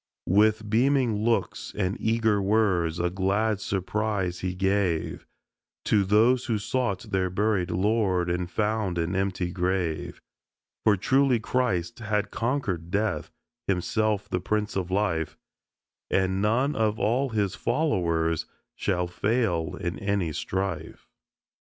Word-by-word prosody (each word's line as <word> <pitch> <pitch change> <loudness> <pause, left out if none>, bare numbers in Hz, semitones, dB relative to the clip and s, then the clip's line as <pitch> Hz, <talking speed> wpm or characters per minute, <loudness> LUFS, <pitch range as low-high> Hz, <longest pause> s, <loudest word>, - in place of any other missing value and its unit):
With 105 +2 +3
beaming 120 -1 +2
looks 115 -4 -1
and 95 -1 0
eager 110 -2 +2
words 95 -5 +2
a 85 0 0
glad 100 +3 +1
surprise 95 -2 -1
He 90 -1 -3
gave 95 -3 0 0.6
To 105 -2 +3
those 115 +6 +3
who 115 -3 0
sought 105 -2 -2
their 95 -1 +1
buried 95 -1 0
Lord 95 -2 +1
and 90 0 -1
found 105 -2 -1
an 85 +2 -1
empty 95 -2 -1
grave; 90 -3 -2 0.7
For 105 -2 +5
truly 130 +4 +3
Christ 115 -4 -1
had 105 -2 -1
conquered 110 - -2
death, 105 +4 -1 0.4
Himself 105 +3 0
the 90 - -1
Prince 105 +2 -1
of 95 -2 -2
Life, 95 -5 0 0.7
And 95 0 +1
none 125 +8 +2
of 110 -1 +1
all 125 +6 +1
His 105 -4 0
Followers 85 - 0 0.3
shall 90 0 0
fail 90 -4 0
in 85 +1 -4
any 100 -5 0
strife. 90 -2 -4
100 Hz, 125 wpm, -26 LUFS, 90-110 Hz, 0.7 s, For